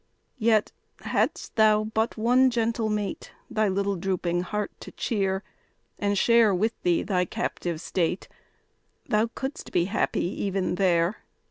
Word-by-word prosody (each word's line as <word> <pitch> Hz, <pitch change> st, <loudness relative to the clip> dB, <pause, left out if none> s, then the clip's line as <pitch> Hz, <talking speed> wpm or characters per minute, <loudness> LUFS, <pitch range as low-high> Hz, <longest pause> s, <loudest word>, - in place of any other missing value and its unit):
Yet, 220 Hz, -2 st, +3 dB, 0.3 s
hadst -, -, -1 dB
thou 215 Hz, -1 st, +5 dB
but 220 Hz, +2 st, -1 dB
one 250 Hz, +4 st, +4 dB
gentle 230 Hz, -2 st, 0 dB
mate 210 Hz, -2 st, -3 dB, 0.2 s
Thy 215 Hz, -1 st, +2 dB
little 200 Hz, +1 st, 0 dB
drooping 175 Hz, -1 st, -1 dB
heart 210 Hz, +3 st, -3 dB
to -, -, -10 dB
cheer, 195 Hz, -3 st, -1 dB, 0.6 s
And 205 Hz, 0 st, 0 dB
share 230 Hz, -2 st, +5 dB
with 220 Hz, +5 st, -1 dB
thee 175 Hz, -1 st, +2 dB
thy 180 Hz, -3 st, +1 dB
captive 170 Hz, -1 st, -3 dB
state, 175 Hz, +2 st, -1 dB, 0.8 s
Thou 215 Hz, +2 st, +2 dB
couldst 265 Hz, +2 st, -5 dB
be 175 Hz, -1 st, +2 dB
happy 195 Hz, -2 st, 0 dB
even 195 Hz, 0 st, -1 dB
there. 180 Hz, 0 st, +2 dB
205 Hz, 135 wpm, -26 LUFS, 185-220 Hz, 0.8 s, thou